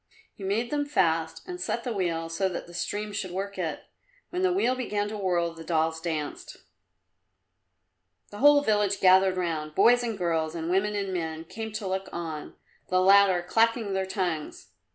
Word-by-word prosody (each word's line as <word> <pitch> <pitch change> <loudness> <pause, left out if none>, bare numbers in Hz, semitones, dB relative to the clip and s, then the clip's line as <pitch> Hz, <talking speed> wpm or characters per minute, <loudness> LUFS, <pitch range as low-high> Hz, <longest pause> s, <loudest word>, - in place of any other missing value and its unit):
He 200 - -11
made 215 +5 -1
them 290 -1 0
fast 165 - 0
and 360 0 -6
set 235 - -2
the 245 - -2
wheel 170 -4 -1
so 165 +4 -1
that 180 - -5
the 175 - -14
stream 205 +4 -3
should 200 -2 -3
work 195 +2 -5
it. - - -3 0.5
When 360 - -2
the 375 -1 +3
wheel 355 -9 +2
began 210 -5 -2
to 215 - -5
whirl 175 -4 0
the 165 0 -10
dolls 160 -1 0
danced. 155 -3 -4 1.7
The 205 - -9
whole 290 +1 +6
village 205 -4 +1
gathered 185 0 +5
round 155 -4 -2
boys 245 +1 +5
and 230 -3 -3
girls 165 -3 -1
and 165 +1 -3
women 205 +3 +1
and 195 -2 -2
men 160 -2 -3
came 220 +5 -6
to 210 -2 -4
look 190 0 -3
on, 160 -3 -6 0.3
the 185 - +3
latter 190 -1 +5
clacking 225 +1 +1
their 190 0 -1
tongues. 175 - -3
190 Hz, 180 wpm, -27 LUFS, 165-210 Hz, 1.7 s, whole